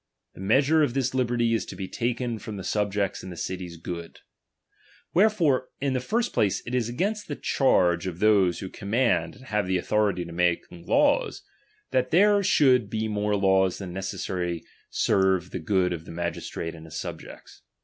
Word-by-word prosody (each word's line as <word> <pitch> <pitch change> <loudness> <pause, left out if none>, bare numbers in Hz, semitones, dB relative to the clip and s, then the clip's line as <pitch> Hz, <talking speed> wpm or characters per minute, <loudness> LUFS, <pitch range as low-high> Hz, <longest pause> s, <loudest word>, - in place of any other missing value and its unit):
The - - -11
measure 140 +10 +3
of 135 -4 +1
this 130 -1 0
liberty 120 -2 +1
is 115 - +1
to - - -7
be 95 - -5
taken 120 0 -2
from 105 -1 -7
the 95 - -6
subjects' 100 -1 -1
and 95 - -8
the 85 - -9
city's 90 -2 -5
good. 85 0 -7 0.9
Wherefore, 170 -10 +3
in 135 -1 0
the 130 - +1
DOMINION. - - -7
17 - - -13
9 - - -20
first 235 +2 0
place, 100 -3 +1
it 120 - -6
is 120 -2 0
against 205 - -2
the 145 - -4
charge 90 -13 +2
of 85 -2 -4
those 100 -3 +3
who 95 - -5
chai - - -13
command 100 -6 +1
and 130 - -15
have 105 -5 -1
the 95 0 +1
authority 100 -1 +1
of 85 - -9
making 85 0 -1
laws, - - +2 0.2
' - - -39
that 130 -1 +1
there 205 +5 +5
should 130 - +4
be 110 +1 -2
more 105 -1 0
laws 95 -2 +3
thau 100 - -6
necessarily 90 -2 -3 0.3
serve 95 -2 +2
for 95 - -5
good 90 +2 +1
of 80 -1 -7
the - - -9
magistrate 85 -1 -4
and 80 -1 -11
his 80 - -6
subjects. - - -9
105 Hz, 200 wpm, -26 LUFS, 90-125 Hz, 0.9 s, there